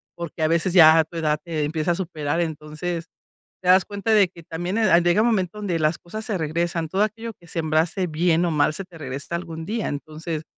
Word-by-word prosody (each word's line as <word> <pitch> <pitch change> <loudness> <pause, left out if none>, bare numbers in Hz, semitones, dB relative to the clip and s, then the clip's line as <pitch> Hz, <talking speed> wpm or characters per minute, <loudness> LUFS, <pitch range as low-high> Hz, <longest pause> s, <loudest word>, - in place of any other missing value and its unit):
porque 170 -1 -7
a 155 - +3
veces 170 +2 +1
ya 160 -3 +8
a 160 - +5
tu 160 +2 -16
edad 155 -2 +1
te 160 -3 -2
empieza 155 +2 -1
a - - +1
superar. 165 -3 -2
Entonces, 160 +2 -4 0.6
te 180 - -6
das 185 +1 +6
cuenta 205 +3 -3
de 205 -4 +5
que 170 -1 -14
también, 175 +5 -4
eh, 190 -6 +5
llega 175 +3 +3
un 230 - +3
momento 200 -4 0
donde 190 -5 -2
las 155 +1 +1
cosas 215 +6 -7
se 210 -3 -1
regresan, 165 +1 -1
todo 190 +5 -1
aquello 225 +2 -4
que 175 - -22
sembrase 165 +3 0
bien 165 +1 +2
o 170 - 0
mal 150 0 +2
se 195 - -5
te 180 -2 -15
regresa 140 +2 -5
algún 165 -2 -6
día. 220 +4 -2
Entonces, 155 +2 -5
170 Hz, 225 wpm, -23 LUFS, 155-185 Hz, 0.6 s, ya